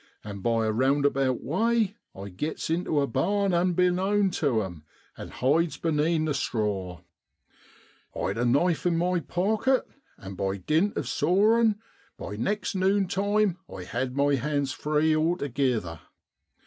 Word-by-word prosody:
And 100 -2 -7
by 115 0 +1
a 110 - +1
roundabout 135 +1 +1
way 220 - +1 0.2
I 100 +1 -7
gits 150 - -4
intu 165 -3 0
a - - +2
barn 195 - 0
unbeknown 180 +3 +2
tu 130 -10 0
'em, 85 -5 -8 0.3
and - - -8
hides 155 +6 +1
benean 160 0 +1
the 155 - 0
straw. 100 -9 -2 1.1
I'd 100 +4 -2
a - - +1
knife 150 +8 +2
in 170 -1 +1
my 180 +1 +1
pocket, 215 +10 0 0.3
and 95 0 -9
by 95 +1 -2
dint 160 - 0
of - - -2
sawin', 210 +7 +3 0.4
by 105 - -6
next 200 - -2
nunetime 195 0 +1 0.3
had 125 +1 -3
my 140 0 +3
hands 140 +1 -1
free 150 +3 +1
altogither. 135 - -1
155 Hz, 135 wpm, -26 LUFS, 120-185 Hz, 1.1 s, sawin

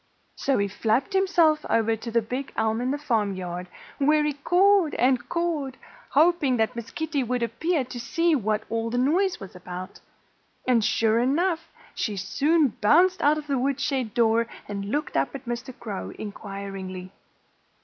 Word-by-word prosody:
So 275 - +1
he 200 - +1
flapped 225 - 0
himself 345 -5 +3
over 225 0 +2
to 225 +2 -7
the 230 0 +1
big 255 +5 -4
elm 220 +1 +1
in 250 - -1
the 285 - 0
farmyard, 190 -9 -2 0.3
where 300 +2 +4
he 300 -1 0
cawed 355 +4 +3
and 250 -1 +2
cawed, 315 -6 -2 0.3
hoping 305 -4 +3
that 225 +2 0
Miss 235 -2 -6
Kitty 320 -2 -2
Cat 255 - -1
would 250 0 0
appear 275 +7 0
to 245 0 -7
see 335 +7 +1
what 215 -6 0
all 230 0 -2
the 245 - -2
noise 355 +9 +2
was 195 -2 -10
about. 180 +1 -8 0.7
And 240 -3 +4
sure 225 +1 +2
enough! 325 +6 0 0.2
she 205 -2 -2
soon 285 - +2
bounced 355 - +4
out 295 +2 +4
of 305 - -5
the 280 -3 0
woodshed 265 -3 -1
door 230 0 +3 0.2
and 200 -1 -4
looked 290 +9 -2
up 135 - 0
at 270 -1 -8
Mr. 240 +2 -4
Crow 205 -4 -5
inquiringly. 195 -3 -7
250 Hz, 170 wpm, -25 LUFS, 220-300 Hz, 0.7 s, where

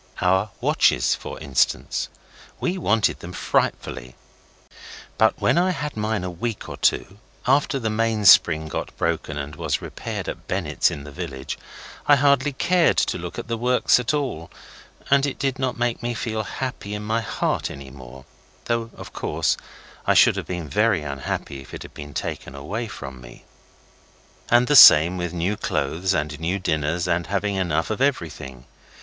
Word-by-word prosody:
Our 95 +3 +2
watches, - - +3
for - - -7
instance. 70 -4 0 0.5
We 180 - -1
wanted 110 - +1
them 90 +1 -9
frightfully; 65 -7 -2 1.0
but - - +3
when - - +3
I 185 +1 +2
had 150 -5 -3
mine 110 -2 -1
a 90 - -3
week 105 +5 -4
or - - -7
two, 100 +2 0 0.3
after 135 +1 +2
the 110 -4 -2
mainspring 105 -8 +5
got - - -5
broken 80 -2 -2
and 75 +1 -5
was - - -1
repaired - - -6
at - - -7
Bennett's 85 -5 +1
in 70 - -7
the 75 - -10
village, 65 -1 -6 0.5
I 145 - +7
hardly 140 0 +3
cared 170 +5 +2
to - - +1
look 85 0 -7
at - - -5
the 115 -1 -3
works 125 +1 +3
at 125 +2 -1
all, 135 - -3 0.6
and 140 0 +5
it 140 - -4
did 135 -1 -2
not 130 -2 -1
make 120 -1 -1
me 120 0 -2
feel 110 -2 -2
happy 110 -2 -5
in 105 - -5
my 110 +2 0
heart 110 - -1
any 70 -1 -9
more, 65 -1 -12 0.4
though, 115 -1 -1
of - - -10
course, - - 0 0.5
I - - +4
should - - +6
have - - -5
been 90 -3 -4
very 100 +3 +2
unhappy 70 -1 -4
if 65 - -10
it - - -8
had - - -12
been 75 -1 -9
taken 65 - -5
away 105 +12 -4
from 65 - -9
me. - - -14 1.0
And 120 +1 +5
the 145 - +2
same 85 - +9
with 90 -1 -3
new 90 +4 -1
clothes 95 -1 -1
and 75 0 -2
nice 90 +4 -2
dinners 80 +2 0
and 85 0 0
having 100 +1 -1
enough 85 -2 -1
of 110 - -3
everything. 80 - -2
95 Hz, 175 wpm, -23 LUFS, 75-120 Hz, 1.0 s, same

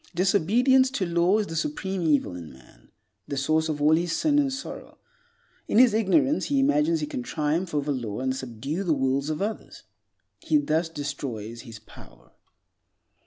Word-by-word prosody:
Disobedience 220 +9 +3
to 190 - 0
law 170 +3 +2
is 215 - 0
the 165 - -7
supreme 195 - -2
evil 145 - +1
in 85 -3 -9
man, 65 -2 -20 0.4
the 140 - -4
source 155 +3 +1
of 150 -1 -2
all 150 +1 +5
his 170 0 -1
sin 295 -2 +2
and 280 -2 +1
sorrow. 265 0 -8 0.7
In - - 0
his 245 -2 +6
ignorance 270 +8 +2
he 280 -1 +1
imagines 300 +4 +2
he - - -1
can 290 -4 -5
triumph 165 -6 -2
over 145 0 0
law 120 -6 -4
and 130 0 -1
subdue 130 - -4
the 165 -5 +1
wills 135 +2 0
of 155 +4 -2
others. 215 +1 -6 0.6
He 305 - +1
thus 165 - 0
destroys 130 -7 -6
his 115 -3 -11
power. 110 - -17
165 Hz, 170 wpm, -25 LUFS, -, 0.7 s, his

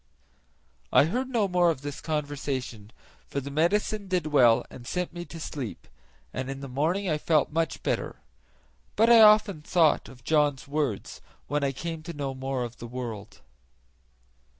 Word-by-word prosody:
I - - +6
heard 250 +10 -2
no 230 -5 +1
more 180 -2 +3
of 150 -6 -2
this 145 0 -6
conversation, 140 -8 -4 0.4
for 140 - -3
the 140 +1 -7
medicine 200 +6 +1
did 180 -4 0
well 125 -6 +4
and 120 -1 -11
sent 180 -1 -2
me 175 0 -6
to 165 - -10
sleep, 140 -7 -6 0.5
and 130 0 -4
in 135 0 -5
the 140 - -6
morning 160 +10 0
I 155 -3 0
felt 155 -2 +2
much 165 -1 -1
better; - - -1 0.8
but 225 +3 +4
I 230 -1 +9
often 210 -5 +6
thought 160 -1 +2
of 125 -2 -15
John's 145 -2 +1
words 140 -8 -2 0.2
when 145 0 -1
I 140 - +1
came 165 +4 -5
to 170 +2 -7
know 140 -3 -3
more 130 -1 -3
of 120 0 -7
the 120 - -8
world. 115 -4 -7
150 Hz, 170 wpm, -27 LUFS, 130-175 Hz, 0.8 s, I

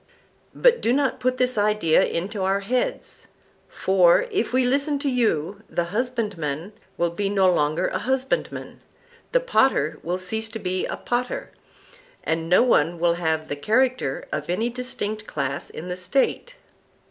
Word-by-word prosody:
But 485 -1 +4
do 230 - +2
not 275 -1 +1
put 255 0 0
this 250 -3 +2
idea 205 -6 +3
into 195 +4 -2
our 195 +1 +1
heads; 250 - -3 0.4
for, 185 - +4
if 410 0 0
we 255 +1 +3
listen 280 +3 +1
to 285 +1 -3
you, 205 -6 0
the 170 0 -2
husbandman 205 - -2 0.2
will 170 0 +1
be 195 +3 -2
no 195 -2 +3
longer 155 +3 +1
a 185 - -2
husbandman, 265 +4 -2 0.5
the - - +4
potter 265 - +2
will 175 +2 -2
cease 220 +4 -4
to 225 - -6
be 185 -1 -2
a - - -4
potter, 245 +1 -3 0.7
and 165 0 -2
no 180 +7 +6
one 170 -8 +2
will 170 0 +2
have 160 -2 -1
the 145 - -3
character 225 - 0
of 150 +1 -4
any 220 +7 0
distinct 215 -4 -4
class 140 -1 -3
in 170 - -8
the 180 0 -4
State. 265 - -1
205 Hz, 160 wpm, -24 LUFS, 170-250 Hz, 0.7 s, no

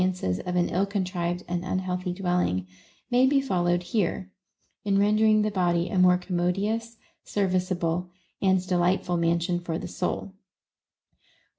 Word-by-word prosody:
425 180 - 0
ances - - -6
of 180 - -2
an 175 -1 +2
ill 190 +3 +1
contrived 180 -3 -2
and 175 0 -2
unhealthy 185 0 -2
dwelling• 175 - 0 0.5
may 250 +2 +5
be 280 +1 +4
followed 175 -8 0
here, 185 0 -1 0.5
in 200 -1 +1
rendering 215 +1 +4
the 215 - 0
body 175 -2 +1
a 190 - 0
more 180 0 +6
commodious, 195 +6 -2 0.3
serviceable, 180 -3 -1 0.3
and 190 -1 +2
delightful 180 0 +1
mansion 170 +1 +1
for 170 -2 -3
the - - -6
soul. 185 +1 -3
180 Hz, 140 wpm, -26 LUFS, 175-195 Hz, 0.5 s, more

